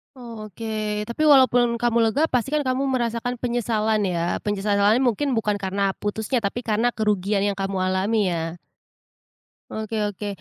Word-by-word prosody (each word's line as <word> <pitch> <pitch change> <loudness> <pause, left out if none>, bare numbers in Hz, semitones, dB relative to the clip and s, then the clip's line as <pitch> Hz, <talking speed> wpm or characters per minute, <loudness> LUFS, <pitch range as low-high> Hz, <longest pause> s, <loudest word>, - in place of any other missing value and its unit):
Oh, 230 -4 -9
oke. 215 0 -3
Tapi 235 +8 -3
walaupun 250 -4 +5
kamu 235 0 +1
lega, 285 +7 +1
pasti 250 +1 0
kan 300 -1 +1
kamu 260 +1 0
merasakan 245 -1 -1
penyesalan 230 -3 0
ya, 170 -1 -1
penyesalannya 205 +2 +2
mungkin 260 +3 +1
bukan 210 -2 0
karena 195 +1 0
putusnya, 220 +4 -1
tapi 225 +3 -3
karena 230 +2 +1
kerugian 205 -2 0
yang 200 -1 -1
kamu 195 0 -2
alami 190 +1 +1
ya? 165 0 -3 1.1
Oke 220 0 -4
oke. 205 +1 -6
220 Hz, 150 wpm, -23 LUFS, 200-240 Hz, 1.1 s, walaupun